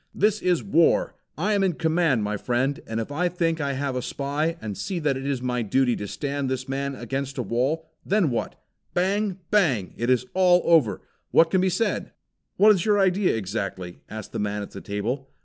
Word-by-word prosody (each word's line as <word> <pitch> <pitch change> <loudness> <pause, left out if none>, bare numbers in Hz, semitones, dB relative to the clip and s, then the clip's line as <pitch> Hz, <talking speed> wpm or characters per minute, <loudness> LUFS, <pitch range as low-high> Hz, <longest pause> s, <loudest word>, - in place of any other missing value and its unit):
"This 210 0 +2
is 180 -3 +1
war. 170 -4 +3 0.2
I 205 +7 +1
am 200 -1 +2
in 190 -2 +2
command, 160 -7 +1
my 105 +1 -1
friend, 125 +6 0
and 115 0 -2
if 115 - -4
I 175 +5 0
think 165 -2 -1
I 140 -1 -1
have 135 -1 -2
a 125 - -1
spy, 145 +6 -2
and 105 -7 -5
see 190 - -4
that 150 -4 0
it 135 +1 -4
is 135 -3 -2
my 125 -1 0
duty 125 +3 +2
to 105 - -5
stand 140 +3 -3
this 130 -1 -3
man 140 +1 -2
up 120 - -9
against 135 +3 -3
a 125 - -1
wall, 130 +9 -1 0.2
then 195 -7 +2
what? 120 - -2 0.4
Bang! 195 +1 +1
Bang! 145 - +2
It 120 +1 -1
is 125 -1 +3
all 180 -1 +4
over. 160 -11 +3 0.3
What 165 0 +4
can 190 - +3
be 190 - +2
said?" 185 +6 -1 0.4
"What 215 +2 +7
is 190 -5 +2
your 210 -1 +3
idea 195 - +3
exactly?" 95 -3 -4
asked 110 -1 -7
the - - -4
man 105 0 -2
at - - -10
the 100 - -8
table. 120 +7 -3
140 Hz, 215 wpm, -25 LUFS, 120-175 Hz, 0.4 s, What